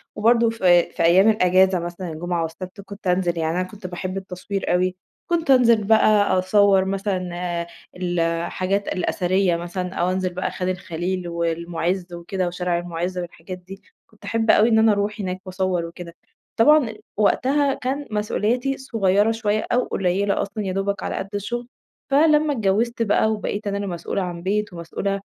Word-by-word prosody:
وبرضو 230 +2 +3
في 180 -6 +3
في - - -2
أيّام 185 +6 +6
الإجازة 185 -2 +4
مثلًا 175 +1 -5
الجمعة 170 +2 -2
والسبت 185 +5 -7
كنت 200 0 -9
أنزل 180 -1 +1
يعني 160 +1 -1
أنا - - +1
كنت 200 -2 -9
باحب 185 +1 -5
التصوير 190 0 -3
أوي، 185 +1 +1 0.3
كنت 330 -4 +1
أنزل 235 -4 +5
بقى 205 -2 +4
أصوّر 195 0 +4
مثلًا 190 -2 -2
آآ 175 -1 -3 0.3
الحاجات 175 +3 -1
الأثرية 185 -1 +1
مثلًا، 180 +2 -4
أو 175 +1 0
أنزل 185 -1 -1
بقى 185 - -2
خان 185 0 -3
الخليلي 180 0 -3
والمعز 170 +2 -2
وكده 180 +2 -3
وشارع 180 0 -1
المعز 175 +1 -4
والحاجات 175 +1 -6
دي، 190 +2 -12 0.3
كنت 215 - -17
أحب 225 -1 +2
أوي 220 +3 +5
إن 220 -1 +4
أنا 220 -1 +5
أروح 205 +2 -1
هناك 185 -1 -3
وأصوّر 185 -2 -1
وكده، 170 0 -9 0.4
طبعًا 250 -1 +5 0.2
وقتها 270 +6 +2
كان 275 +3 -3
مسؤوليتي 230 +5 0
صغيّرة 210 -4 +1
شويّة 215 -1 -1
أو 245 +1 +2
قليّلة 195 +2 0
أصلًا 200 +1 -4
يا 185 - -2
دوبك 195 0 -2
على - - -3
قد 195 - -4
الشغل، 240 +4 -4 0.4
فلمّا 300 0 +4
اتجوّزت 230 +2 0
بقى 220 0 +2
وبقيت 210 0 -3
أنا 200 0 -1
اللي 200 0 -3
مسؤولة 175 +2 -3
عن 175 -2 -5
بيت 205 0 -1
ومسؤولة 195 +4 -3
190 Hz, 165 wpm, -22 LUFS, 180-215 Hz, 0.4 s, أيّام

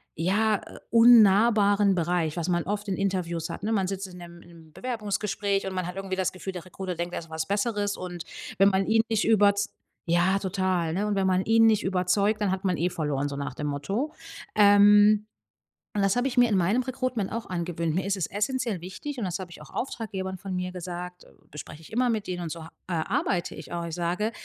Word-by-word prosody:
ja, 205 +6 +2
äh, - - -12
unnahbaren 210 -3 +6
Bereich, 170 -2 0
was 170 - -2
man 175 -1 +1
oft 205 +1 -3
in 190 - 0
Interviews 180 -4 -2
hat, 170 - -7
ne? 215 - -1
Man 195 -4 +1
sitzt 195 0 -3
in 180 -1 -12
'nem 170 -1 -11
im 165 -2 -16
Bewerbungsgespräch 205 -3 -2
und 190 - -4
man 185 -2 -2
hat 180 - -6
irgendwie 195 -1 -3
das 190 -1 0
Gefühl, 190 +1 -7
der 180 -1 -7
Recruiter 185 0 -5
denkt, 175 +1 -4
er - - -2
ist 165 - -14
was 160 0 -3
Besseres 205 0 -1
und 175 -2 -6 0.4
wenn 195 +1 +7
man 190 0 +1
ihn 225 +1 +4
nicht 220 -2 +1
überz 205 -2 +3 0.3
ja, 180 +3 +3
total, 185 -4 -1
ne? 200 +4 -1
Und 210 - 0
wenn 195 -1 +1
man 185 0 +2
ihn 225 0 +5
nicht 220 -2 +4
überzeugt, 190 +3 +1
dann 200 -2 +1
hat 190 +1 -3
man 180 -3 +1
eh 175 +3 +1
verloren, 145 -4 -1
so 140 - -5
nach 140 -2 -4
dem 150 - -4
Motto. 195 - -2 0.4
Ähm. 205 0 +6 0.7
Und 205 - +2
das 195 0 +3
habe 245 +2 +1
ich 250 - -3
mir 245 -1 +6
in 210 - +2
meinem 195 +8 +2
Recruitment 255 -5 -2
auch 230 0 -4
angewöhnt. 170 -2 -2
Mir 180 +4 -1
ist 200 0 0
es 185 - -2
essenziell 215 -1 -1
wichtig 220 - -7
und 230 - -2
das 180 -1 -3
habe 185 -2 -7
ich - - -12
auch - - -14
Auftraggebern 190 -7 -4
von 190 0 -6
mir 180 0 -2
gesagt, 180 0 -7 0.2
bespreche 150 +1 -9
ich 160 - -14
immer 250 +2 +2
mit 220 -3 -1
denen 180 -1 -3
und 160 - -4
so 165 -1 -7
ha - - -10 0.2
äh, - - -4
arbeite 175 +2 -1
ich - - -10
auch. 170 0 -3
Ich 165 -1 -5
sage: 180 +5 -1
190 Hz, 230 wpm, -26 LUFS, 175-210 Hz, 0.7 s, wenn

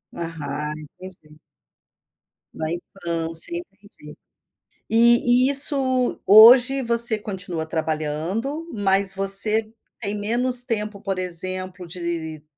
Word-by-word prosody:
Aham, 150 -3 -7 0.3
entendi. 155 -5 -15 1.1
Na 160 - -6
infância, 170 - -4
entendi. 200 - -15 0.7
E 240 +2 +3
e - - +1
isso 270 -3 +3
hoje, 245 +6 +6
você 235 -1 +3
continua 185 -5 -7
trabalhando 160 - -5
mas 195 -1 +1
você 210 +3 +2 0.3
tem 205 -3 -4
menos 245 +4 +3
tempo, 210 -4 -5
por 195 -2 -5
exemplo, 185 0 -1
de 165 -3 -7
195 Hz, 95 wpm, -20 LUFS, 170-235 Hz, 1.1 s, hoje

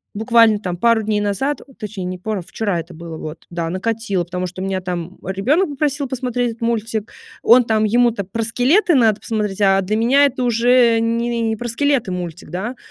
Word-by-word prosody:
буквально 225 -1 +4
там 180 -4 -4
пару 230 +4 +3
дней 210 0 0
назад, 205 +8 -1 0.2
точнее, 210 -4 -6
не 180 0 -4
пару 210 +1 -3
вчера 195 +1 -2
это 165 +2 -8
было 165 0 -8
вот, 155 +1 -8
да, 170 -1 -3
накатило, 200 0 -1
потому 180 +1 -3
что 185 +1 -8
у - - -2
меня 195 -1 -1
там 180 0 -5
ребенок 265 - +1
попросил 285 -1 -1
посмотреть 245 -1 -2
этот 225 - -13
мультик. 225 -2 -2 0.3
Он 245 +2 +6
там 220 -1 +1
ему-то 235 -1 +2
про 225 +5 -3
скелеты 275 - +2
надо 220 -5 +3
посмотреть, 210 -3 -3
а 195 -1 +4
для 200 +3 -1
меня 260 +6 +4
это 260 -2 -1
уже 240 0 +4
не 235 +1 -1
не 220 -1 0
про 240 +2 -5
скелеты 265 -3 0
мультик, 175 -1 -6
да? 205 +8 -4
220 Hz, 195 wpm, -19 LUFS, 190-240 Hz, 0.3 s, Он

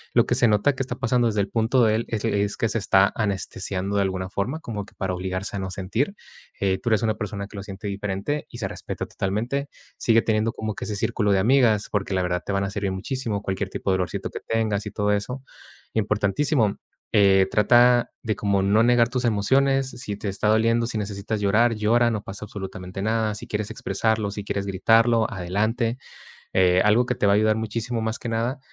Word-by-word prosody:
Lo - - +5
que - - 0
se 120 - +4
nota 105 +7 +3
que 135 - -5
está 130 - -3
pasando 120 -1 +1
desde 105 -2 +1
el 100 - -2
punto 115 +3 +2
de 110 -1 +4
él 115 - -1
es 110 -1 -2
es 100 -2 0
que 115 - 0
se 115 - -1
está 95 -1 +4
anestesiando 100 -1 -2
de - - +3
alguna 95 -1 -3
forma, 125 +12 -3
como 105 -3 -5
que - - -20
para 95 -1 -2
obligarse 95 +2 -4
a - - -3
no 95 0 -4
sentir, 105 - -2 0.4
eh, 95 -1 +1
tú - - -1
eres 110 0 +2
una 110 -1 +1
persona 105 -1 -4
que 105 - -14
lo 100 - -4
siente 100 0 -9
diferente 100 +8 -3
y 120 - -10
se 100 - -2
respeta - - -5
totalmente. 120 +9 -2 0.3
Sigue 115 -1 +3
teniendo 110 0 +1
como 110 -1 -4
que - - -5
ese 105 - -3
círculo 105 -1 0
de 95 - +3
amigas, 115 -1 +3
porque 100 -2 -1
la 95 - +1
verdad 90 0 -1
te - - -3
van 100 0 +1
a 100 - -3
servir 100 -1 -2
muchísimo, 105 0 -3
cualquier 95 0 -2
tipo 95 - -2
de - - +3
dolorcito 90 -1 -3
que - - -6
tengas 110 -2 -1
y - - -5
todo 105 0 0
eso. 125 +6 -2 0.5
Importantísimo, 105 +3 +1 0.4
eh, 95 -2 +5
trata 120 +4 +4
de 110 -2 -1
como 100 -1 +1
no 100 +3 +3
negar 120 -1 +4
tus 125 0 -2
emociones, 135 +5 +2
si 105 -5 -6
te 105 - -5
está 100 +2 0
doliendo, 115 +2 +3
si 115 - -3
necesitas 105 +1 -3
llorar, 110 +4 +3
llora, 115 +3 +3
no 110 -2 -2
pasa 100 +1 -8
absolutamente 95 -2 -7
nada, 110 +1 0
si 115 +3 -8
quieres 110 -2 -3
expresarlo, 110 -1 -1
si 105 0 -5
quieres 100 -1 -3
gritarlo, 115 +4 +3
adelante, 110 +6 -1 0.6
eh, 90 0 +4
algo 110 +4 +4
que 125 - -1
te - - 0
va 100 - +5
a - - +4
ayudar 110 +1 +3
muchísimo 115 +2 -3
más 110 +2 -2
que 120 - -5
nada, 115 +4 -1
105 Hz, 220 wpm, -24 LUFS, 100-115 Hz, 0.6 s, Lo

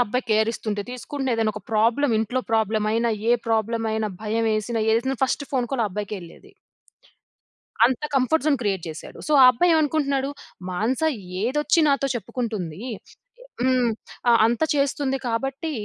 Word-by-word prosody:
అబ్బాయి 250 +3 -2
కేరిస్తుంటే 215 -1 0
తీసుకుండే, 265 +2 -4
ఏదన్నొక 215 -1 -1
ప్రాబ్లమ్, 230 +5 +2
ఇంట్లో 225 +4 -1
ప్రాబ్లమయినా, 220 +1 +1 0.2
ఏ - - +6
ప్రాబ్లమయినా, 220 -1 0
భయమేసిన, 220 +1 0
ఏదేసినా 250 +4 +1
first 265 +2 +1
phone 250 -3 +1
call 255 -3 +1
ఆ - - +1
అబ్బాయికెళ్ళేది. 205 - -7 1.3
అంత 255 0 0
కంఫర్ట్ 270 +4 +2
జోన్ 300 -3 +3
క్రియేట్ 195 -5 -1
జేశాడు. 155 -1 -9
సో, 305 - -2
ఆ - - +10
అబ్బాయేవనుకుంటున్నాడు, 290 -2 +2 0.4
మానస 220 - -1 0.4
ఏదొచ్చినాతో 295 +1 +2
చెప్పుకుంటుందీ! 215 -6 -4 0.6
య - - -13 0.2
హ్మ్. 255 -1 +2 0.4
ఆహ్, 230 -1 +6
అంత 235 0 -1
చేస్తుంది 280 -1 0
కాబట్టీ 270 +7 -2
235 Hz, 125 wpm, -23 LUFS, 220-270 Hz, 1.3 s, ఆ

